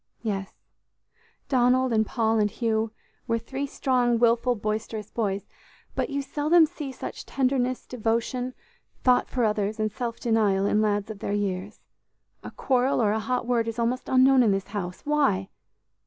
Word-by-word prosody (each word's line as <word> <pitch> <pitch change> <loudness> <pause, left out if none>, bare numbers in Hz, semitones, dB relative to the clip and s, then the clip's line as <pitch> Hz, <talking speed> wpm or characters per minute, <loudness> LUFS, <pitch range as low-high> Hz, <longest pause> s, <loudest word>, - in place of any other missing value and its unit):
"Yes, 195 -3 -3 0.9
Donald 255 -1 +3
and 220 -1 +4
Paul 225 -2 +1
and 210 -1 +2
Hugh 220 -1 -1 0.4
were 230 -1 +1
three 265 +5 -4
strong, 250 -3 +1
willful, 235 +1 +3
boisterous 215 0 -4
boys, 200 -4 -2 0.5
but - - -1
you 280 -1 -2
seldom 310 +4 +4
see 305 -4 -6
such - - -7
tenderness, 255 -1 0
devotion, 245 +2 -2 0.5
thought 250 -1 +3
for 250 - -1
others 210 0 0
and 215 0 0
self 230 +1 -4
denial 210 -4 +2
in 210 +1 +2
lads 205 0 0
of 210 - -9
their 200 - -3
years. 200 0 -3 0.6
A - - -6
quarrel 260 0 +1
or 215 -3 +3
a 220 - 0
hot 250 +2 -1
word 235 -2 +1
is 230 0 -4
almost 240 +2 -1
unknown 260 0 +5
in 230 - +4
this 195 -1 -1
house. 185 -3 -5
Why? 275 -11 +1
230 Hz, 160 wpm, -26 LUFS, 210-255 Hz, 0.9 s, unknown